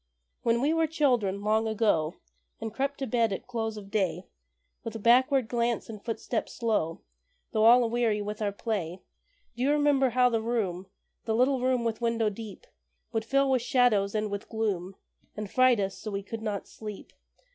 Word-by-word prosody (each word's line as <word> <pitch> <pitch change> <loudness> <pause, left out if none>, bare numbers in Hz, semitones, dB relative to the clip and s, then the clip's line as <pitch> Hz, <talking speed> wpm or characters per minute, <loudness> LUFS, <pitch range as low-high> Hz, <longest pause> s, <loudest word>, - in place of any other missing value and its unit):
When 235 0 +2
we 295 +4 +2
were 325 -1 +2
children, 245 -11 +1
long 220 +1 +2
ago, 205 -8 +1 0.4
And 220 -1 -5
crept 275 +3 -1
to 270 - -3
bed 230 -2 +1
at 195 - -4
close 225 -3 -3
of 200 -1 -10
day, 185 -4 0 0.6
With 225 -2 -6
backward 255 +1 +4
glance 235 0 -1
and 215 -2 -8
footstep 230 0 -3
slow, 210 -9 -1 0.5
Though 215 0 +2
all 240 +2 +7
aweary 230 -2 +1
with 210 +1 -5
our 205 -1 0
play, 195 -5 -4 0.5
Do 240 - -6
you 265 - +2
remember 290 -3 +3
how 250 +1 +4
the 230 -2 0
room 200 -6 -2 0.4
The 220 - 0
little 255 +2 +2
room 255 -1 +1
with 230 0 -2
window 230 -2 +1
deep 220 - -9 0.5
Would 225 -1 -2
fill 275 +2 +2
with 255 -2 +3
shadows 230 -5 +2
and 215 -1 -1
with 200 0 -5
gloom, 195 -4 -2 0.4
And 210 -2 -5
fright 255 -3 +4
us 195 -1 -2
so 215 - -6
we 200 -1 -3
could 225 +2 -6
not 210 -3 -3
sleep? 210 -2 -9
225 Hz, 180 wpm, -28 LUFS, 205-245 Hz, 0.6 s, all